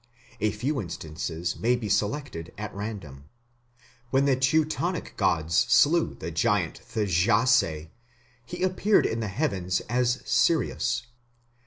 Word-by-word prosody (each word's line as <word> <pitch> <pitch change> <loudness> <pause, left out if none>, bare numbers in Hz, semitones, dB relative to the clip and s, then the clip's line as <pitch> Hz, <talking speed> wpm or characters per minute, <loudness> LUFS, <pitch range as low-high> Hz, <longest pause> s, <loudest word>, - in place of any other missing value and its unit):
A 110 - +2
few 130 +8 -2
instances 85 0 -5
may 120 +2 +2
be 120 -3 -4
selected 105 - -2
at 105 0 -6
random. 100 -10 -7 0.8
When 135 +2 +2
the 140 -2 +3
Teutonic 155 +6 0
gods 85 -5 0
slew 160 +7 +4
the 80 - -6
giant 95 0 0
Thjasse, 105 - +2 0.6
he 175 +8 -6
appeared 185 +3 +3
in 115 - -1
the 110 - -2
heavens 95 - -1
as 125 +1 0
Sirius. 125 -6 +1
110 Hz, 120 wpm, -26 LUFS, 90-135 Hz, 0.8 s, slew